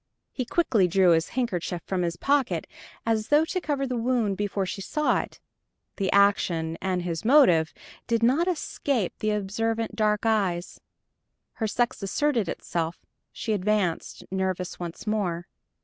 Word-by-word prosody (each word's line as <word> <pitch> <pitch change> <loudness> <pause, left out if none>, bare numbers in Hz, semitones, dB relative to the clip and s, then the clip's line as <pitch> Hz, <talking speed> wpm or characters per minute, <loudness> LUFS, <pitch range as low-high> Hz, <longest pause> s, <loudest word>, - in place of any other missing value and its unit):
He 255 - -3
quickly 235 - +2
drew 180 0 +4
his 165 0 +2
handkerchief 180 -8 -1
from 190 -2 -1
his 170 -1 -1
pocket, 275 -2 +1 0.4
as 220 -1 0
though 295 +2 +4
to 370 +3 -2
cover 285 -4 -1
the 255 -1 -2
wound 230 -4 +1
before 200 -1 -1
she 195 +2 -5
saw 300 +9 +1
it. - - -7 0.6
The 195 -2 0
action 175 -5 +3
and 185 -2 -1
its 165 -2 -3
motive 215 - +5 0.4
did 230 -1 +1
not 280 +9 +3
escape 280 - -1
the 215 - 0
observant 220 +2 -1
dark 210 0 +1
eyes. 190 -6 0 0.7
Her 220 - -2
sex 240 +2 0
asserted 230 - 0
itself; 165 -1 -3 0.3
she 220 - -2
advanced, 200 -3 -1
nervous 190 -1 -2
once 170 +2 -6
more. 185 -6 -1
210 Hz, 150 wpm, -26 LUFS, 180-240 Hz, 0.7 s, motive